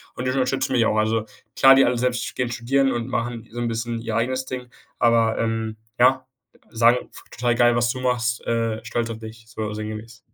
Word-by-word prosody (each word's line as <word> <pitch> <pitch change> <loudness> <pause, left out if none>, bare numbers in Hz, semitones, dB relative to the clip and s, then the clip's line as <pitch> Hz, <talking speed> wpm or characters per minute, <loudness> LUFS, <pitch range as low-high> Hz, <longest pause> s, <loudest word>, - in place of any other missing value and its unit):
Und 125 - -4
die 130 - +1
unterstützen 130 0 0
mich 120 -3 +3
auch, 110 - +1
also 110 +1 +1 0.3
klar, 135 0 +7
die 135 - +6
alle 125 - +1
selbst 125 -1 -1
gehen 125 -2 -1
studieren 135 +4 +1
und 120 0 -2
machen 115 -2 -3
so 120 - -6
'n 120 - -1
bisschen 115 0 -3
ihr 115 -1 -4
eigenes 130 +3 0
Ding, 125 -1 -6 0.3
aber, 115 -1 +3
ähm, 115 -1 -2 0.2
ja, 130 +1 +4 0.4
sagen: 115 +2 +4 0.3
„Total 120 0 0
geil, 120 0 +4
was 120 0 +2
du 130 - -5
machst, 120 -2 0
äh, 115 -1 0
stolz 115 0 -2
auf 110 -1 -6
dich.” 110 0 -10
so 110 -2 -4
sinngemäß. 110 +2 -7
120 Hz, 205 wpm, -23 LUFS, 115-125 Hz, 0.4 s, klar